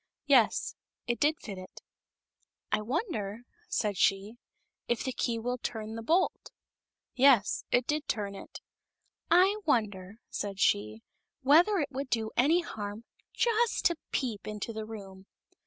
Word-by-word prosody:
Yes; - - +3 0.3
it 240 0 -1
did 300 +1 +3
fit 195 -4 -7
it. 185 - -11 0.5
" - - -48
I - - +2
wonder," 230 - -3 0.3
said 210 -3 0
she, 200 +6 +1 0.2
" - - -52
if 240 -2 0
the 260 - -2
key 235 -2 -1
will 245 +2 -3
turn 220 -2 -5
the 225 - -5
bolt 335 +10 +1 0.4
?" - - -62 0.2
Yes; 255 -6 +4
it 245 0 +3
did 300 +2 -1
turn 205 -2 -2
it. 195 - -10 0.4
" - - -48
I 380 +5 +4
wonder," 205 - 0 0.2
said 200 -1 -4
she, 105 - +1 0.2
" - - -56
whether 335 +10 +5
it 290 -5 -1
would 275 0 -4
do 220 -2 -1
any 310 +8 +4
harm 210 -7 -6 0.3
just 470 0 +1
to 345 - +4 0.2
peep 230 -6 -2
into 215 +2 -4
the 220 0 -5
room 195 -3 -10
230 Hz, 160 wpm, -30 LUFS, 205-290 Hz, 0.5 s, whether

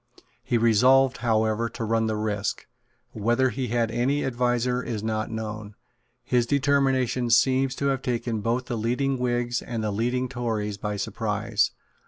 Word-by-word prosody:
He 120 - +1
resolved, 125 +4 +4
however, 110 0 +1
to 115 - -6
run 115 0 +1
the 110 - -1
risk. 105 -1 -2 0.5
Whether 120 +4 +1
he 125 +3 -3
had 115 -1 0
any 130 +5 0
adviser 125 0 0
is 115 -4 -4
not 110 -1 -2
known. 110 -2 -6 0.5
His 120 -1 +1
determination 135 -3 +1
seems 130 +3 +3
to 140 - -3
have 135 -1 -1
taken 120 -3 -2
both 120 +4 -1
the 120 -3 -3
leading 125 +4 0
Whigs 120 -1 0
and 115 -2 -4
the 105 - -1
leading 125 +5 -1
Tories 110 -5 -3
by 105 0 -3
surprise. 105 +1 -1
120 Hz, 155 wpm, -25 LUFS, 110-125 Hz, 0.5 s, resolved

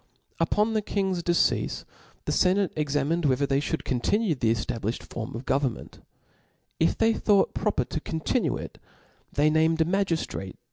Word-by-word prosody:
tJpbn 215 +2 +2
the 215 - +1
kiqg*5 190 -3 -1
deceafe 175 -1 +1 0.4
the - - -1
fenate 190 0 +2
exaniined 150 +2 0
whe 130 -3 +4
ther 140 - +1
they 135 0 +1
IJiouid 155 +2 -2
continue, 180 - +1
the 120 -5 +1
cftabliflied 115 0 -2
form 115 -1 -6
of. 120 +3 -6
jgovtrnment. 135 -3 -2 0.8
If 165 - +2
they 225 0 +3
thought 205 -3 +2
proper 205 - 0
to 155 - -4
continucl.. 160 0 -1
it, - - -9 0.5
they 150 +1 +3
iiam(*d 160 +1 +3
a - - -6
faiigiftrate 170 - -1
160 Hz, 155 wpm, -26 LUFS, 135-190 Hz, 0.8 s, whe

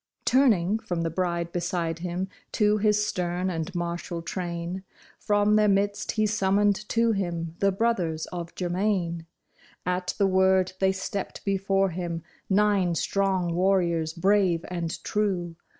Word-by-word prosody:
Turning 220 -6 +3
from 175 -5 -3
the 165 0 -1
bride 170 -1 -1
beside 170 -1 -2
him 180 +2 -3 0.2
to 210 -1 +2
his 210 0 +3
stern 180 -1 -1
and 165 +2 -4
martial 170 0 -3
train, 175 +1 -4 0.4
From 205 0 +3
their 215 0 +4
midst 205 +1 +1
he 215 -1 +2
summoned 205 0 +1
to 230 0 +3
him 170 -5 -2
the 195 0 +3
brothers 185 -7 0
of 170 -1 -6
Germain; 175 -2 -1 0.6
At 180 0 -1
the 200 - +3
word 190 -1 +3
they 190 0 +3
stepped 190 0 -5
before 195 -1 +1
him, 170 -1 -4 0.3
nine 195 -3 +3
strong 190 -2 0
warriors, 170 -3 +1
brave 185 -1 +2
and 170 -1 -4
true. 185 -5 -1
185 Hz, 135 wpm, -26 LUFS, 170-200 Hz, 0.6 s, their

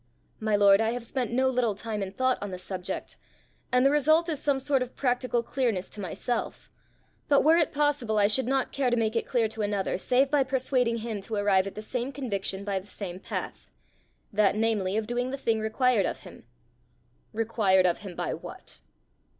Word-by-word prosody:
"My 215 -1 +1
lord, 200 0 +6
I 225 +1 +1
have 245 -1 -4
spent 245 -2 -2
no 260 +2 +2
little 245 -5 +1
time 215 0 -4
and 195 0 -5
thought 260 0 +2
on 205 - -4
the 185 - -5
subject, 180 0 -6 0.5
and 250 +1 +4
the 275 - +5
result 310 +4 +3
is 300 -3 -2
some 280 -2 +1
sort 270 0 +1
of 250 -1 -4
practical 250 -2 0
clearness 235 -7 -1
to 210 - -7
myself; 200 +6 -4 0.6
but, 280 - +5
were 320 +2 +6
it 330 - +2
possible, 285 -7 0
I 205 - +5
should 220 +4 +2
not 265 0 0
care 275 -2 0
to 240 - +1
make 220 0 0
it 230 - -1
clear 235 -3 +2
to 220 0 -5
another 205 -3 -1
save 265 +6 +2
by 290 -2 +4
persuading 255 -2 0
him 220 -4 -4
to 220 +3 -4
arrive 200 -2 +2
at 195 - -7
the 215 - -6
same 250 +3 -3
conviction 200 -8 -3
by 200 -2 -1
the 190 - -15
same 185 -2 -6
path - - -6 0.6
that, 205 -1 +3
namely, 215 -3 0
of 220 - -1
doing 245 +2 -2
the 275 - -4
thing 230 -4 0
required 220 0 +2
of - - -5
him." - - -13 0.9
"Required 210 -4 +2
of 175 -1 +2
him 190 -4 -8
by - - -2
what?" - - -9
230 Hz, 205 wpm, -27 LUFS, 205-260 Hz, 0.9 s, lord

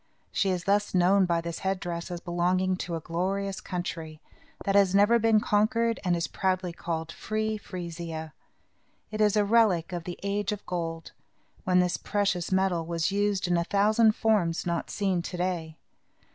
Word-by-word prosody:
She 195 - +1
is 180 -2 -1
thus 205 0 +1
known 185 +1 +4
by 170 -1 +1
this 170 0 -5
head 190 0 -1
dress 170 -1 -5
as 175 -1 -4
belonging 180 +1 0
to 175 -2 -4
a - - -2
glorious 190 +4 -2
country, 165 -4 -5 0.5
that 195 - +1
has 195 -1 +4
never 205 +4 +5
been 225 -1 +4
conquered 230 +3 +1
and 180 -2 +2
is 170 0 -1
proudly 185 -2 -1
called 165 -1 -4
Free 215 +3 -2
Frisia. 170 -5 -6 0.8
It 215 0 -2
is 210 0 +3
a 205 - +3
relic 200 -5 +3
of 170 -2 -4
the 175 - -5
age 200 0 -1
of 205 -1 -5
gold, 165 -2 -4 0.5
when 180 0 +4
this 180 -1 0
precious 200 -4 -1
metal 190 -3 +2
was 165 +2 -1
used 200 -1 0
in 175 -1 +2
a 170 - +1
thousand 215 +4 +3
forms, 200 -7 +1
not 170 -1 -2
seen 190 -4 0
to 180 +1 -6
day. 175 -3 -2
185 Hz, 175 wpm, -27 LUFS, 170-205 Hz, 0.8 s, never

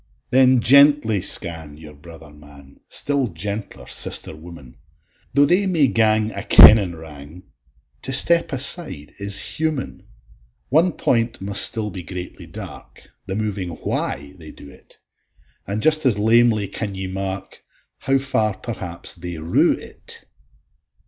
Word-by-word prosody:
Then 130 -1 +3
gently 140 -5 +4
scan 80 -6 -1
your 75 -1 -14
brother 80 +1 -15
man, 70 -2 -18
Still 140 -3 -1
gentler 100 +3 -7
sister - - -2
woman; 75 -6 -14 0.6
Tho' 140 0 +4
they 185 +6 +1
may 165 -6 +2
gang 110 -1 +1
a - - -6
kennin 100 -6 +6
wrang, 80 +2 -13 0.6
To 135 - -5
step 170 +6 +5
aside 135 - -1
is 100 0 +1 0.2
human: 155 -4 -4 0.6
One 165 +5 +2
point 115 -1 -1
must 100 +1 +6
still 110 -2 +3
be 95 - -8
greatly 90 0 -9
dark, - - -12 0.2
The 95 - -5
moving 105 -4 -4
Why 70 -3 -5
they 80 -2 -11
do 70 - -14
it; - - -21 0.7
And 105 +3 -4
just 155 0 +3
as 115 -5 +1
lamely 110 -1 +2
can 100 +1 -6
ye 95 0 -6
mark, 95 0 -6 0.4
How 135 0 0
far 110 -7 -1
perhaps 90 -7 -6
they 90 -1 -8
rue 80 +2 +1
it. - - -8
100 Hz, 135 wpm, -20 LUFS, 85-125 Hz, 0.7 s, kennin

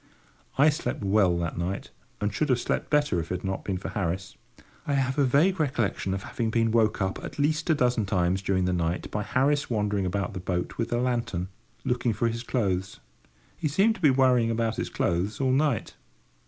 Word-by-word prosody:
I 145 +3 +6
slept 150 -7 -3
well 95 -3 +3
that 85 -1 -3
night, 85 -7 -3 0.3
and 105 -1 -1
should 150 +7 0
have 125 -2 +3
slept - - -2
better 145 - +2
if 85 0 -5
it - - 0
had 90 - -6
not 95 0 -3
been 95 -2 -2
for 95 - -6
Harris. 95 -1 -3 0.5
I 145 - +1
have 135 0 0
a - - +5
vague 160 +9 +3
recollection 115 -9 0
of 95 - -5
having 115 -2 -2
been 115 0 +1
woke 110 -3 +2
up 95 0 -3
at - - -7
least 150 +3 0
a 160 - +5
dozen 125 -6 +1
times 95 -1 +1
during 95 -1 +1
the 90 - +1
night 85 0 -2
by 105 - -1
Harris 140 +6 +1
wandering 105 -4 0
about 95 0 -2
the - - -4
boat 90 -1 -3
with 115 - -1
the 120 - 0
lantern, 120 -7 -1 0.4
looking 125 -1 +1
for 115 +3 0
his 115 +1 -4
clothes. 100 -6 -1 0.6
He 160 - -2
seemed 195 +10 +3
to 220 - -13
be 150 - +6
worrying 130 -3 +4
about 115 -1 0
his - - -2
clothes 90 +5 -1
all 130 -1 +2
night. 135 -4 +1
110 Hz, 210 wpm, -27 LUFS, 95-130 Hz, 0.6 s, I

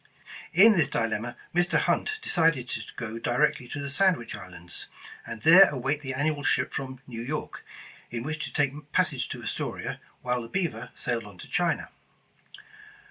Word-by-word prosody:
In 210 +5 +7
this 160 -5 +3
dilemma, 115 +1 -2 0.2
Mr. 175 +1 +3
Hunt 430 - +1
decided 160 - +2
to 110 - -2
go 115 -1 -5
directly 120 +1 +1
to 145 - -5
the 140 0 -4
Sandwich 180 -6 +2
Islands, 90 -3 -6 0.4
and 110 - -7
there 180 +5 +9
await 140 +2 -1
the 130 -2 -4
annual 145 +1 0
ship 130 -2 +1
from 130 -1 -5
New 115 -3 -7
York, 150 +6 -4 0.5
in 115 0 -4
which 155 +2 -3
to - - -7
take 145 +1 -1
passage - - +1
to - - -6
Astoria, - - -3 0.2
while 125 -1 0
the 115 - -7
Beaver 125 - -2
sailed 115 -2 -2
on 100 -3 -12
to - - -10
China. 175 -1 0
135 Hz, 165 wpm, -27 LUFS, 115-155 Hz, 0.5 s, there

